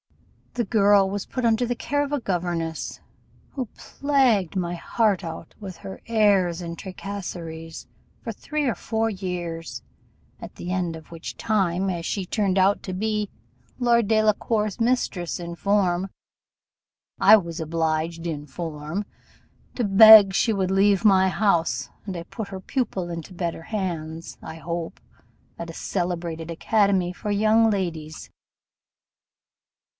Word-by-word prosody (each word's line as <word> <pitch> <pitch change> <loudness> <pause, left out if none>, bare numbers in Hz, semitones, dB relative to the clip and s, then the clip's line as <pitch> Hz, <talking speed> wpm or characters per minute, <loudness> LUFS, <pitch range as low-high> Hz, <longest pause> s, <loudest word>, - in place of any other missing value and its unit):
The 240 -2 0
girl 200 -2 +4
was 200 0 -4
put 255 -2 -3
under 230 +1 +3
the 240 +1 -1
care 285 +4 -1
of 285 - -5
a 290 - 0
governess, 175 -6 -3 0.5
who 260 -4 -4
plagued 250 - +1
my 175 -1 -1
heart 205 +2 0
out 165 -1 -7
with 190 -4 -7
her 190 +3 -9
airs 200 -6 +3
and 170 -1 -6
tracasseries 175 -4 -7 0.3
for - - -5
three 305 -2 -3
or 240 -6 +1
four 225 +4 -1
years; 170 - -5 0.6
at - - -9
the 180 - -6
end 175 -3 -1
of 160 0 -13
which 165 -1 -7
time, 195 -3 0
as 170 -2 -3
she 195 +1 -2
turned 195 -1 0
out 195 +2 +3
to 185 - -5
be 210 +1 -1 0.5
Lord 235 -3 +3
Delacour's 215 -1 +1
mistress 230 -9 0
in 170 0 -6
form, 190 -1 +1 1.1
I 220 - +8
was 170 -4 -5
obliged 160 +1 -1
in 150 -3 -4
form 160 +5 -5 0.7
to 245 - -1
beg 205 0 +9
she 225 - +2
would 190 -3 0
leave 195 +1 +3
my 190 -2 +5
house: 165 - +1 0.2
and 190 -4 -5
I 170 - -5
put 210 +4 -7
her 190 -1 -6
pupil 190 -5 -2
into 170 +2 -7
better 170 -2 -3
hands, 165 -4 -4
I 160 - -8
hope, 170 +1 -5 0.6
at 170 - -5
a - - -7
celebrated 170 -2 -3
academy 195 0 +1
for 205 +3 -4
young 220 +2 +4
ladies. 165 -6 -3
190 Hz, 140 wpm, -24 LUFS, 170-215 Hz, 1.1 s, beg